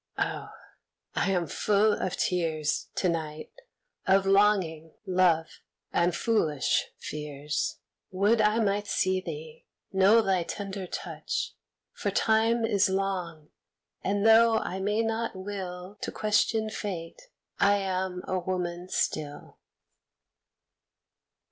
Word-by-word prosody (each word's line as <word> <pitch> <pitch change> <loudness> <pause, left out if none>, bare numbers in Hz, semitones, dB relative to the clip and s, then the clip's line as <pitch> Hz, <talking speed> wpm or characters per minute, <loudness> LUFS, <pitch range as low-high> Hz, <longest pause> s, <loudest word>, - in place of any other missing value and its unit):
Oh! - - -2 0.6
I 200 - +1
am 180 -3 +1
full 210 +7 +2
of 185 - -2
tears 160 -4 0
To 185 - +1
night, 155 -2 -3 0.6
of 195 0 +4
longing, 195 -6 +2
love 180 -4 +2 0.3
and 170 +1 +2
foolish 160 - +1
fears. 150 0 -3 0.3
Would 205 +4 +3
I 210 +1 +3
might 205 0 0
see 185 -1 +1
thee, 155 -3 -8 0.3
know 200 +4 +5
thy 190 -3 +2
tender 195 +2 -5
touch, - - -4 0.4
For - - -2
Time 225 +1 +2
is 205 -3 +3
long, 185 -5 -2 0.5
and 200 +1 0
though 225 0 +6
I 190 -3 -3
may 210 +3 +1
not 225 0 -2
will 190 -1 -6
To - - -3
question 215 +1 +1
Fate, 190 - -6 0.3
I 200 0 +5
am 185 -2 -2
a 185 - 0
woman 180 0 -3
still. 145 -4 -3
190 Hz, 115 wpm, -28 LUFS, 170-210 Hz, 0.6 s, though